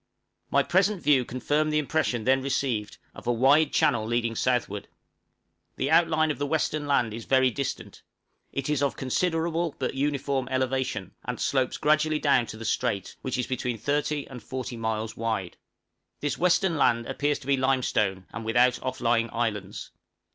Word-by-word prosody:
My - - +3
present 195 +1 +1
view 140 -4 +4
confirmed 145 +5 0
the 150 - +1
impression 150 -6 0
then 130 +2 +3
received, 130 -6 -2 0.2
of - - -11
a - - +3
wide 140 +6 +4
channel 115 -2 +2
leading 115 +1 0
southward. 115 -5 -1 0.9
The - - -1
outline 160 -2 +4
of 145 - -6
the 145 - -1
western 155 -1 -1
land 120 -6 +2
is 115 0 -7
very 130 -1 +3
distant; 140 +1 -5 0.5
it 135 -1 -3
is 150 -2 0
of 140 - 0
considerable 165 +3 0
but 130 - -2
uniform 140 -1 -1
elevation, 130 0 -1
and - - -4
slopes 130 -2 0
gradually 155 +1 +2
down 140 -6 +2
to 110 - -8
the 115 - -7
strait, 105 -3 -1
which 130 -1 -3
is 125 - 0
between 125 -2 -2
30 145 +4 -1
and 125 -3 -9
40 130 -2 -5
miles 110 -1 -3
wide. 110 -6 -3 0.6
This 145 - -1
western 180 -1 +2
land 115 -4 +2
appears 145 +3 0
to - - -14
be 140 0 +3
limestone, 125 -8 0
and 115 - -5
without 120 +2 +3
off 130 0 -4
lying 115 -1 +2
islands. 105 -4 -3
130 Hz, 170 wpm, -27 LUFS, 115-145 Hz, 0.9 s, view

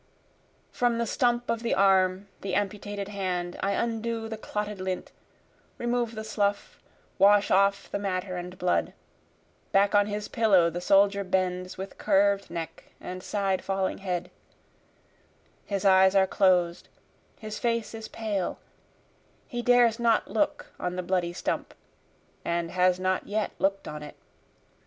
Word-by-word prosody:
From 240 -1 +1
the 235 - 0
stump 240 0 +1
of 230 -1 -1
the 235 - 0
arm, 190 0 +3
the 195 -2 -2
amputated 205 0 -3
hand, 180 -3 -3
I 200 +1 +1
undo 230 +1 -2
the 220 - -5
clotted 210 -2 -4
lint, 185 -1 -4 0.7
remove 240 -1 -1
the 220 - -5
slough, 205 -2 -2 0.4
wash 205 +1 +5
off 200 +1 +3
the - - -2
matter 185 -1 -2
and 180 +1 -6
blood, 180 -1 0 0.8
Back 200 +1 +3
on 205 0 +4
his 210 0 -4
pillow 190 -7 +3
the 175 +2 -4
soldier 200 +1 +4
bends 185 -1 -1
with 190 +1 -8
curv'd 200 -1 +2
neck 165 -1 -6
and 185 0 -7
side 195 -1 -1
falling 195 -1 -1
head, 180 -3 -3 1.4
His 200 -1 -2
eyes 190 0 +6
are 190 -1 +6
closed, 180 -3 +2 0.5
his 215 -1 -6
face 230 -2 -1
is 225 -1 -7
pale, 210 -5 -3 0.9
he 240 -3 -4
dares 240 -1 +4
not 230 -2 +2
look 220 - -1
on 180 0 -3
the 180 - -3
bloody 180 -1 0
stump, 175 - -3 0.7
And 170 0 -1
has 180 0 +3
not 185 0 -1
yet 215 +1 -1
look'd 195 0 0
on 150 0 -6
it. 150 - -9
195 Hz, 145 wpm, -27 LUFS, 185-215 Hz, 1.4 s, eyes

